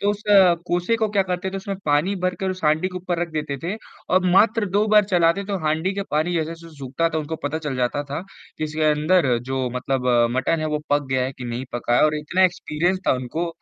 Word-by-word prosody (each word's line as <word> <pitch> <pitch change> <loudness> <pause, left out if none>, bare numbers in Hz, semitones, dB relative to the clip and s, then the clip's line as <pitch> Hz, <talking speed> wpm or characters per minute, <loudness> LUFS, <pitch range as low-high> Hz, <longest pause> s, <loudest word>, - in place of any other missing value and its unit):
तो 205 - +2
उस 205 0 -5 0.4
कोसे 180 +6 +1
को 220 -1 0
क्या 200 -2 +2
करते 185 0 -3
थे 195 - -5
उसमें 195 0 -4
पानी 150 +7 +2
भरकर, 185 +1 -2
उस 185 0 -6
हाँडी 155 +5 +2
के 180 - -8
ऊपर 180 -1 -3
रख 175 - -1
देते 150 -2 -3
थे 180 +5 -2 0.4
और 185 0 +3
मात्र 215 +3 +4
2 205 +2 +2
बार 210 0 +5
चलाते 175 -1 +2
थे, - - -9
तो 200 -1 -2
हाँडी 160 +5 0
के 200 - -2
पानी 155 +4 0
जैसे-जैसे 165 0 -4
सूखता 140 +5 -1
था, 160 -1 -2
उनको 155 +1 -4
पता 145 +2 -2
चल 150 -4 -4
जाता 125 +3 0
था 145 - -2 0.4
कि - - -1
इसके 155 +1 -3
अंदर 150 -4 +2
जो 130 +1 -3
मतलब 125 0 -2
अ, 120 -1 +4
मटन 155 +5 +1
है 155 - -1
वो - - -2
पक 145 -1 +2
गया 130 -1 +1
है 130 - -3
कि 130 - -9
नहीं 120 +1 -4
पका 120 0 0
है - - +5
और 155 - +2
इतना 185 +5 +1
एक्सपीरियंस 175 0 0
था - - +5
उनको 130 +7 -3
165 Hz, 245 wpm, -22 LUFS, 145-185 Hz, 0.4 s, बार